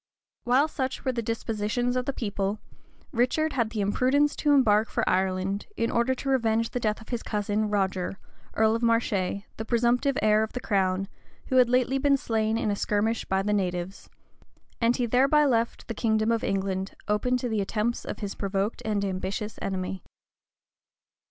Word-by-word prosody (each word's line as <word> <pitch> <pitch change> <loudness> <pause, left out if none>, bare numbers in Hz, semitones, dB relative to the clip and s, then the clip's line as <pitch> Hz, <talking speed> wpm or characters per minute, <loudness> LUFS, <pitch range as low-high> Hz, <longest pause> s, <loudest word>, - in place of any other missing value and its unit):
While 260 +5 +4
such 265 -4 -4
were 260 - +2
the 240 -2 -2
dispositions 230 +2 -1
of 250 -1 0
the - - +2
people, 205 -4 -2 0.5
Richard 280 +5 +1
had 235 -4 0
the 220 -2 -3
imprudence 260 +8 +2
to 295 - +2
embark 220 -6 +4
for - - -1
Ireland, 190 +1 0
in 230 - 0
order 235 +3 +1
to 275 - -4
revenge 230 -3 +1
the 245 - -2
death 215 -2 -1
of 220 - -14
his 240 -2 -2
cousin, 210 0 -1
Roger, 190 -2 -1 0.4
earl 220 0 +3
of 230 - -2
Marche, 230 -1 +2 0.5
the 220 - -3
presumptive 245 +4 +2
heir 215 0 +4
of 220 - -2
the 250 - -3
crown, 195 -4 0 0.4
who 260 - +2
had 250 -2 +6
lately 255 +2 +2
been 280 0 +3
slain 220 -3 0
in 215 -2 0
a - - 0
skirmish 215 +3 0
by 190 0 0
the 210 +1 0
natives; 180 -1 -2 0.7
and 235 +1 +3
he 250 - +1
thereby 275 +6 +4
left 235 -4 0
the 230 - -3
kingdom 220 0 +1
of 230 -1 0
England 195 -1 -2
open 215 +4 +1
to 250 - -3
the 220 -3 0
attempts 215 +4 -1
of - - -6
his 200 -1 -3
provoked 200 +2 -2
and 210 -2 0
ambitious 195 +3 -4
enemy. 190 0 -3
220 Hz, 180 wpm, -27 LUFS, 200-245 Hz, 0.7 s, had